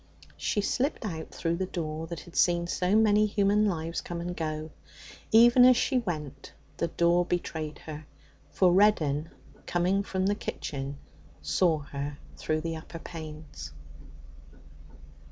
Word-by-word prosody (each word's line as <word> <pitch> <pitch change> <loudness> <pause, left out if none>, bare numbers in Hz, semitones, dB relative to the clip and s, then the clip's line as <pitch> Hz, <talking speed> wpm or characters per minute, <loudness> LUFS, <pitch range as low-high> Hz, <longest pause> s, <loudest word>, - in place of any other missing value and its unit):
She 205 - 0
slipped 260 +5 -1
out 160 -5 -5
through 170 0 -2
the 190 +1 -2
door 160 -2 -4
that 170 -1 -6
had 175 - -15
seen 175 -1 +3
so 180 +3 0
many 215 -1 +5
human 205 +1 +2
lives 165 -3 -2
come 170 -1 -5
and 175 +1 -4
go. 155 -1 -4 0.6
Even 240 +3 +7
as 250 -1 +7
she 260 -2 +2
went, 155 - -5 0.2
the 170 - 0
door 170 +1 +3
betrayed 160 -3 -3
her, 155 -1 -8 0.4
for 185 -2 +3
Reddin, 165 -7 +3 0.4
coming 180 +3 +1
from 190 -2 -2
the 200 - +3
kitchen, 140 -8 -5 0.5
saw 160 - +2 0.2
her 140 +1 -4 0.2
through 155 0 -1
the 165 0 -3
upper 160 +1 -9
panes. 155 - -9
170 Hz, 140 wpm, -28 LUFS, 155-200 Hz, 0.6 s, Even